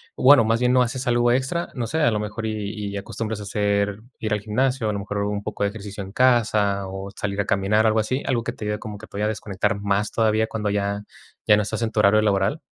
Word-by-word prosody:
bueno, 135 Hz, -2 st, +7 dB
más 115 Hz, +1 st, +1 dB
bien, 125 Hz, 0 st, +2 dB
no 130 Hz, -, +5 dB
haces 130 Hz, +2 st, -3 dB
algo 120 Hz, 0 st, +3 dB
extra, 135 Hz, +8 st, 0 dB
no 120 Hz, -3 st, -3 dB
sé, 160 Hz, +6 st, -1 dB
a 120 Hz, -7 st, +4 dB
lo 105 Hz, -, 0 dB
mejor 105 Hz, +1 st, -5 dB
y 105 Hz, -1 st, -4 dB
y -, -, -3 dB
acostumbras 110 Hz, +2 st, -4 dB
a -, -, -6 dB
hacer 100 Hz, 0 st, 0 dB, 0.2 s
ir 110 Hz, -, -3 dB
al 105 Hz, -, +1 dB
gimnasio, 125 Hz, +3 st, 0 dB
a -, -, -1 dB
lo 100 Hz, -, -3 dB
mejor 105 Hz, +1 st, -5 dB
un 100 Hz, 0 st, -2 dB
poco 105 Hz, -1 st, -3 dB
de 100 Hz, -, +2 dB
ejercicio 100 Hz, -1 st, -8 dB
en 95 Hz, -, -9 dB
casa 105 Hz, -6 st, +2 dB
o 95 Hz, +1 st, -6 dB
salir 100 Hz, -1 st, -3 dB
a -, -, -3 dB
caminar, 105 Hz, +1 st, +2 dB
algo 110 Hz, 0 st, +3 dB
así? 130 Hz, +6 st, -1 dB
¿Algo 120 Hz, -3 st, 0 dB
que -, -, -2 dB
te -, -, -9 dB
ayude, 105 Hz, 0 st, -2 dB
como 105 Hz, -2 st, -7 dB
que 105 Hz, -, -11 dB
todavía 105 Hz, +1 st, -3 dB
a -, -, +2 dB
desconectar 105 Hz, 0 st, -2 dB
más 100 Hz, +1 st, 0 dB
todavía 110 Hz, -1 st, +2 dB
cuando 105 Hz, -2 st, -2 dB
ya 100 Hz, 0 st, -1 dB, 0.4 s
ya 105 Hz, -, +6 dB
no -, -, +2 dB
estás 110 Hz, +2 st, -3 dB
en 115 Hz, -1 st, -1 dB
tu 110 Hz, -, -1 dB
horario 105 Hz, +1 st, +5 dB
laboral? 105 Hz, +6 st, +1 dB
105 Hz, 260 wpm, -23 LUFS, 100-115 Hz, 0.4 s, bueno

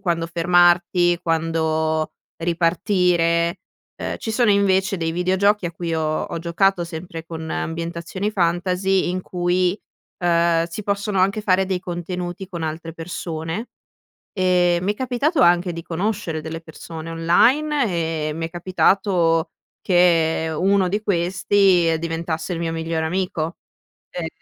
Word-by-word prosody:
quando 170 Hz, -4 st, -1 dB
fermarti, 175 Hz, +1 st, +3 dB
quando 160 Hz, -1 st, 0 dB, 0.3 s
ripartire. 170 Hz, 0 st, +1 dB, 0.4 s
Uhm, -, -, -3 dB
ci 220 Hz, -, -5 dB
sono, 235 Hz, 0 st, +3 dB
invece, 195 Hz, -1 st, +2 dB
dei 165 Hz, -2 st, -2 dB
videogiochi 190 Hz, +3 st, +2 dB
a 170 Hz, -, -5 dB
cui 170 Hz, 0 st, -3 dB
ho 155 Hz, -1 st, -1 dB
ho -, -, -4 dB
giocato, 175 Hz, +2 st, +1 dB
sempre 165 Hz, 0 st, -7 dB
con 160 Hz, -1 st, -6 dB
ambientazioni 170 Hz, +4 st, -3 dB
fantasy, 185 Hz, +1 st, +1 dB
in 185 Hz, +1 st, -2 dB
cui, 180 Hz, +2 st, 0 dB, 0.4 s
uhm, 170 Hz, -1 st, +2 dB
si 170 Hz, +5 st, -7 dB
possono 200 Hz, -1 st, -1 dB
anche 195 Hz, +3 st, +2 dB
fare 190 Hz, -2 st, +2 dB
dei 185 Hz, -1 st, -1 dB
contenuti 175 Hz, +1 st, -5 dB
con 170 Hz, -4 st, -6 dB
altre 160 Hz, +1 st, -5 dB
persone, 165 Hz, +4 st, -5 dB, 0.6 s
ehm, 180 Hz, -2 st, +2 dB
mi 200 Hz, +3 st, +1 dB
è -, -, -16 dB
capitato 260 Hz, +6 st, 0 dB
anche 175 Hz, +1 st, +4 dB
di 165 Hz, -, -6 dB
conoscere 180 Hz, -1 st, -2 dB
delle 160 Hz, +1 st, -6 dB
persone 160 Hz, 0 st, -9 dB
online, 255 Hz, -, +3 dB, 0.4 s
e -, -, -2 dB
mi 165 Hz, +1 st, -3 dB
è -, -, -10 dB
capitato 175 Hz, -1 st, +1 dB, 0.3 s
che 165 Hz, -3 st, +3 dB
uno 195 Hz, +1 st, +2 dB
di 205 Hz, +3 st, -1 dB
questi 180 Hz, -2 st, +2 dB
diventasse 165 Hz, +1 st, -3 dB
il -, -, -4 dB
mio 165 Hz, -1 st, -2 dB
migliore 165 Hz, 0 st, -2 dB
amico. 175 Hz, -1 st, -2 dB, 0.6 s
Ehm 175 Hz, -2 st, -4 dB
175 Hz, 135 wpm, -21 LUFS, 165-190 Hz, 0.6 s, anche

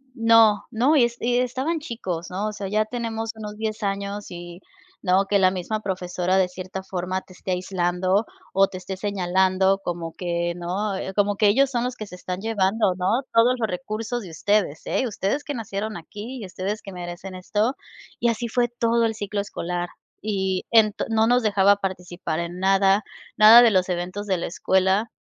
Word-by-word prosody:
no, 225 Hz, -3 st, +5 dB
no, 255 Hz, +7 st, +3 dB
y 260 Hz, -, +6 dB
es 235 Hz, 0 st, -4 dB
y 245 Hz, +1 st, +1 dB
estaban 265 Hz, +6 st, -1 dB
chicos, 190 Hz, -, -5 dB
¿no? 200 Hz, +3 st, -2 dB
O 215 Hz, -, -4 dB
sea, 200 Hz, -2 st, -5 dB
ya 215 Hz, +2 st, +1 dB
tenemos 225 Hz, -1 st, -4 dB
unos 210 Hz, -1 st, -7 dB
10 220 Hz, 0 st, -3 dB
años 200 Hz, +1 st, -3 dB
y, 175 Hz, 0 st, -8 dB, 0.4 s
¿no?, 190 Hz, +1 st, +3 dB
que 200 Hz, -, +3 dB
la 185 Hz, -1 st, +5 dB
misma 190 Hz, +4 st, -3 dB
profesora 185 Hz, -1 st, -1 dB
de 185 Hz, -1 st, +3 dB
cierta 185 Hz, +1 st, -6 dB
forma 185 Hz, 0 st, -3 dB
te 185 Hz, -, -17 dB
esté 185 Hz, +1 st, -6 dB
aislando 185 Hz, +2 st, 0 dB, 0.3 s
o 195 Hz, 0 st, +5 dB
te 185 Hz, -, -8 dB
esté 190 Hz, +1 st, -6 dB
señalando 190 Hz, 0 st, +2 dB
como 170 Hz, -2 st, -4 dB
que 170 Hz, -1 st, -2 dB
¿no? 185 Hz, +4 st, -2 dB, 0.2 s
Como 205 Hz, 0 st, +2 dB
que 210 Hz, -, +4 dB
ellos 265 Hz, +7 st, +4 dB
son 240 Hz, -3 st, -1 dB
los 250 Hz, 0 st, -3 dB
que 215 Hz, -, -7 dB
se 180 Hz, -, -10 dB
están 180 Hz, 0 st, -5 dB
llevando, 205 Hz, -2 st, +1 dB
¿no?, 190 Hz, +7 st, +1 dB
todos 235 Hz, +2 st, +5 dB
los 220 Hz, -, 0 dB
recursos 215 Hz, +6 st, -4 dB
de 175 Hz, -, -9 dB
ustedes, 200 Hz, -2 st, 0 dB
¿eh?, 260 Hz, -, 0 dB
ustedes 215 Hz, +6 st, -2 dB
que 290 Hz, -, -4 dB
nacieron 215 Hz, -3 st, -4 dB
aquí 215 Hz, +9 st, -8 dB
y 205 Hz, -, -5 dB
ustedes 195 Hz, +4 st, -4 dB
que 195 Hz, -, -9 dB
merecen 180 Hz, +1 st, -7 dB
esto. 210 Hz, +7 st, 0 dB, 0.4 s
Y 235 Hz, -, +2 dB
así 230 Hz, +1 st, -2 dB
fue 240 Hz, +1 st, +1 dB
todo 235 Hz, 0 st, +1 dB
el 225 Hz, -, 0 dB
ciclo 205 Hz, -1 st, -3 dB
escolar. 175 Hz, -3 st, -4 dB, 0.3 s
Y 190 Hz, -3 st, -1 dB
ento 220 Hz, -3 st, +4 dB
no 220 Hz, 0 st, +3 dB
nos 245 Hz, +1 st, +3 dB
dejaba 200 Hz, -1 st, +4 dB
participar 180 Hz, -4 st, -4 dB
en 170 Hz, +1 st, -4 dB
nada, 195 Hz, +1 st, +3 dB, 0.3 s
nada 220 Hz, +3 st, +10 dB
de 240 Hz, -, +7 dB
los 185 Hz, -2 st, +2 dB
eventos 180 Hz, +3 st, -3 dB
de 190 Hz, -2 st, +1 dB
la -, -, -3 dB
escuela, 190 Hz, +5 st, +1 dB
200 Hz, 190 wpm, -24 LUFS, 185-225 Hz, 0.4 s, nada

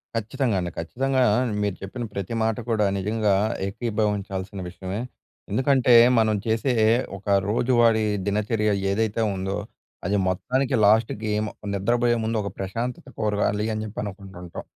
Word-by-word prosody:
ఖచ్చితంగా 115 Hz, +1 st, -1 dB
అండి. 90 Hz, -1 st, -3 dB
ఖచ్చితంగా 130 Hz, +10 st, 0 dB, 0.4 s
మీరు 100 Hz, -2 st, -1 dB
చెప్పిన 100 Hz, +6 st, -5 dB
ప్రతి 100 Hz, +2 st, -4 dB
మాట 110 Hz, -1 st, 0 dB
కూడా 110 Hz, -2 st, +2 dB
నిజంగా 105 Hz, +1 st, +1 dB, 0.3 s
ఏకీభవించాల్సిన 100 Hz, -3 st, -2 dB
విషయమే. 95 Hz, +2 st, -5 dB, 0.5 s
ఎందుకంటే 130 Hz, +2 st, +3 dB, 0.3 s
మనం 110 Hz, -1 st, +3 dB
చేసే 115 Hz, +4 st, +1 dB, 0.4 s
ఒక 100 Hz, -, -16 dB, 0.2 s
రోజువారీ 115 Hz, -1 st, +3 dB, 0.2 s
దినచర్య 105 Hz, +1 st, +1 dB, 0.2 s
ఏదైతే 110 Hz, +2 st, 0 dB
ఉందో 95 Hz, +1 st, -2 dB, 0.5 s
అది 100 Hz, +3 st, +1 dB
మొత్తానికి 130 Hz, +9 st, 0 dB
లాస్ట్‌కి 110 Hz, 0 st, +2 dB, 0.4 s
నిద్రపోయే 120 Hz, +4 st, +2 dB
ముందు 110 Hz, +1 st, -1 dB
ఒక 100 Hz, -, -3 dB
ప్రశాంతత 115 Hz, +6 st, -4 dB
కోరగాలి 105 Hz, 0 st, 0 dB
అని 110 Hz, 0 st, -3 dB
చెప్పి 110 Hz, 0 st, -7 dB
అనుకుంటుంటాం. 95 Hz, -4 st, -8 dB
105 Hz, 120 wpm, -24 LUFS, 100-115 Hz, 0.5 s, ఎందుకంటే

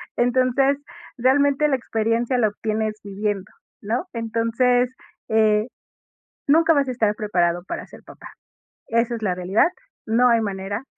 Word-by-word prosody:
Entonces, 255 Hz, +3 st, +2 dB, 0.4 s
realmente, 280 Hz, +3 st, +3 dB
la 280 Hz, -, +2 dB
experiencia 230 Hz, +1 st, -1 dB
la 220 Hz, -3 st, +3 dB
obtienes 215 Hz, +1 st, -2 dB
viviendo, 200 Hz, -1 st, -3 dB, 0.3 s
¿no? 230 Hz, -, -2 dB
Entonces, 230 Hz, +2 st, +1 dB, 0.4 s
eh, 215 Hz, 0 st, +3 dB, 0.8 s
nunca 325 Hz, +3 st, +5 dB
vas 280 Hz, -2 st, +1 dB
a -, -, -1 dB
estar 220 Hz, -4 st, +1 dB
preparado 175 Hz, -5 st, 0 dB
para -, -, -5 dB
ser -, -, -14 dB
papá. -, -, -12 dB, 0.6 s
Esa 230 Hz, +1 st, +1 dB
es 225 Hz, -, -7 dB
la 190 Hz, -4 st, 0 dB
realidad, 185 Hz, -, +2 dB, 0.4 s
no 240 Hz, +3 st, +4 dB
hay 230 Hz, -1 st, +3 dB
manera. 200 Hz, +2 st, -4 dB
230 Hz, 135 wpm, -22 LUFS, 210-250 Hz, 0.8 s, nunca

